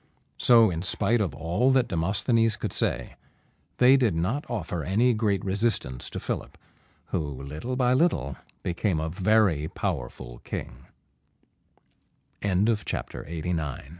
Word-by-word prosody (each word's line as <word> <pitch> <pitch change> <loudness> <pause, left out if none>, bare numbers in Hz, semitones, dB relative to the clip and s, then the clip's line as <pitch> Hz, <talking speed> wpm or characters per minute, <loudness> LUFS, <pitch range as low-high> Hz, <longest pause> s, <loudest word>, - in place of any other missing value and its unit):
So, 115 -4 +6
in 80 -1 -3
spite 105 +4 +1
of 85 -9 -2
all 85 - +1
that 130 -2 +3
Demosthenes 105 +6 +1
could - - -4
say, - - -2 0.6
they 130 +2 +7
did 120 -9 +2
not 105 - -1
offer 90 -8 -3
any 115 - +3
great 105 -4 0
resistance 95 - -1
to - - -5
Philip, - - -5 0.5
who - - 0
little 75 - -5
by 125 -1 +3
little 130 - +1 0.3
became 90 -1 0
a 80 +1 -2
very 95 -4 +2
powerful 65 -10 -5
100 Hz, 110 wpm, -26 LUFS, 80-120 Hz, 0.6 s, they